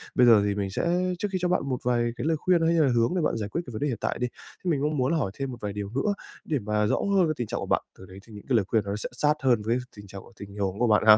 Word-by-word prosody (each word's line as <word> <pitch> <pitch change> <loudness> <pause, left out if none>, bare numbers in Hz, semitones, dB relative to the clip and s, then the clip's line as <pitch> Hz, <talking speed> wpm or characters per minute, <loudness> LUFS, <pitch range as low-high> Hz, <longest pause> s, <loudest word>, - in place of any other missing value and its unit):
Bây 125 - +6
giờ 110 -3 +7
thì 100 -1 0
mình 100 -1 -2
sẽ 180 - 0
trước 205 - 0
khi 190 - 0
cho 180 - +2
bạn 180 - +2
một 125 - 0
vài 120 -1 +1
cái - - -4
lời 160 -1 +2
khuyên 175 +1 +2
hay 165 - +3
hay 165 - +4
là - - +2
hướng 115 +4 +3
để 180 - +1
bạn 115 - 0
giải 105 -1 -3
quyết 170 - -2
cái 125 - -8
vấn 110 - -6
đề 145 - +1
hiện 120 -6 -2
tại - - -1
đi, 125 - 0 0.4
thế 180 - -1
mình 140 -3 0
cũng 150 0 0
muốn 130 +4 +1
là 165 - +2
hỏi 100 -10 -1
thêm 135 0 -4
một 120 - -7
vài 105 -1 -3
điều 100 -1 -4
nữa 140 - 0 0.3
để 150 -4 0
mà 105 0 0
rõ - - +2 0.2
hơn 180 -4 +4
về 155 - 0
tình 120 -3 -3
trạng - - -3
của - - -4
bạn, - - +1 0.2
từ 95 - -12
đấy 95 +1 -12
thì 110 - -14
những 105 - -11
cái 125 - +3
lời 105 -4 +3
khuyên 110 -2 +2
nó 100 +1 -2
sẽ 105 - -4
sát 150 +5 +2
hơn 120 -5 +3
với 115 +2 +2 0.2
tình 100 -1 -11
trạng 95 0 -9
của - - -17
tình 100 0 -9
huống 100 0 -2
của 120 - +3
bạn 105 -1 +4
ha. 110 0 +10
120 Hz, 365 wpm, -26 LUFS, 105-150 Hz, 0.4 s, ha